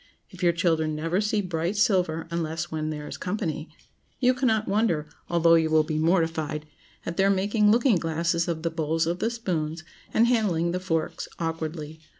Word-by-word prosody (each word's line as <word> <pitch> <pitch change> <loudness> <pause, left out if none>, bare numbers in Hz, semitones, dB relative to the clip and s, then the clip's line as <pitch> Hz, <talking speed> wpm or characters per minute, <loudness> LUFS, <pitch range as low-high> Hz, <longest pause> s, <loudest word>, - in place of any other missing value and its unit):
If 185 - -12
your 175 -1 +4
children 160 -2 +1
never 165 +5 0
see 210 0 +1
bright 175 +1 -2
silver 180 -7 +2
unless 170 +1 -3
when 155 -1 -2
"there 150 -1 -5
is - - -6
company," 175 -5 -3 0.5
you 255 0 +4
cannot 225 -4 +1
wonder, 195 -7 +1 0.2
although 170 -1 +4
you 160 -1 +4
will 155 0 +4
be 155 0 -2
mortified, 160 -2 0 0.4
at 170 - -4
their 195 +1 +4
making 205 +2 +2
looking 230 -1 +4
glasses 170 +1 0
of 165 -2 -3
the 165 - 0
bowls 160 0 0
of 170 +2 -2
the 225 - +1
spoons, 170 -9 -3 0.3
and 225 - +4
handling 195 -9 +1
the 180 - -1
forks 165 -4 -2
awkwardly. 160 -1 -4
170 Hz, 175 wpm, -26 LUFS, 160-195 Hz, 0.5 s, your